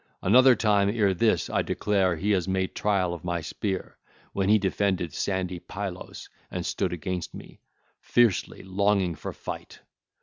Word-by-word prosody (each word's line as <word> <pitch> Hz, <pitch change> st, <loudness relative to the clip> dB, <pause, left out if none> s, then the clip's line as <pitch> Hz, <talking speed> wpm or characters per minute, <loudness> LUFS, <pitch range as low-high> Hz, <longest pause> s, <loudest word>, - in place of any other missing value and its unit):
Another 125 Hz, +6 st, +7 dB
time 100 Hz, -3 st, +3 dB
ere 100 Hz, -3 st, +2 dB
this 90 Hz, -4 st, +2 dB
I -, -, 0 dB
declare 95 Hz, -4 st, +1 dB
he 100 Hz, +6 st, -1 dB
has 95 Hz, -3 st, +1 dB
made 95 Hz, 0 st, -1 dB
trial 95 Hz, -4 st, +1 dB
of 85 Hz, -, -8 dB
my 85 Hz, -1 st, -1 dB
spear, 95 Hz, +4 st, -4 dB, 0.3 s
when 95 Hz, 0 st, 0 dB
he 110 Hz, -, +7 dB
defended 95 Hz, -4 st, 0 dB
sandy 95 Hz, -2 st, -2 dB
Pylos 95 Hz, 0 st, -7 dB, 0.2 s
and -, -, -4 dB
stood -, -, -1 dB
against 90 Hz, 0 st, -4 dB
me, -, -, -12 dB, 0.4 s
fiercely 120 Hz, -6 st, +1 dB
longing 95 Hz, -1 st, +1 dB
for 75 Hz, -, -6 dB
fight. -, -, -8 dB
95 Hz, 155 wpm, -26 LUFS, 90-105 Hz, 0.4 s, Another